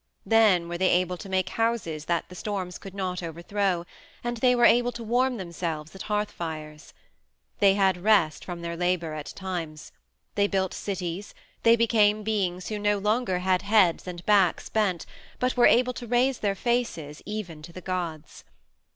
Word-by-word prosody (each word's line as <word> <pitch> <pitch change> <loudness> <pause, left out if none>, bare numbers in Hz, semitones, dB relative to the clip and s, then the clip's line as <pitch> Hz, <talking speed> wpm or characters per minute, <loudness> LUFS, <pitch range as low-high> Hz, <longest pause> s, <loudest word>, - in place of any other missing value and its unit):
Then 210 -7 +4
were 175 0 -5
they 185 - +3
able 180 0 +2
to 195 - -9
make 185 -1 0
houses 215 -10 -1
that 170 -1 -1
the - - -12
storms 185 -2 -4
could 195 -1 -10
not 185 -2 -3
overthrow, 175 +2 -2 0.4
and 240 0 -2
they 250 +2 +4
were 240 -1 +4
able 245 +1 +5
to 235 - -7
warm 245 +3 +1
themselves 170 -4 -5
at 190 - -9
hearth 210 0 0
fires. 155 -2 -7 0.7
They 195 -1 +5
had 190 -3 +2
rest 200 -8 +3
from 175 -2 -6
their 170 0 -3
labor 175 -2 0
at 150 -1 -6
times. 170 -5 -6 0.4
They 200 0 +2
built 190 -2 -1
cities; 190 0 -5 0.3
they 230 0 +6
became 215 -2 +3
beings 190 -4 -1
who 215 -1 -3
no 205 0 +2
longer 210 -1 0
had 185 -1 +3
heads 200 -5 +3
and 175 -1 -7
backs 200 -5 +3
bent 195 -6 0 0.3
but 250 0 0
were 245 - +6
able 250 +1 +4
to 240 -1 -8
raise 245 +2 +2
their 200 -2 0
faces 195 -10 -2
even 200 -7 -5
to 165 +3 -11
the 185 - -9
gods. 175 -4 -5
190 Hz, 175 wpm, -26 LUFS, 175-215 Hz, 0.7 s, they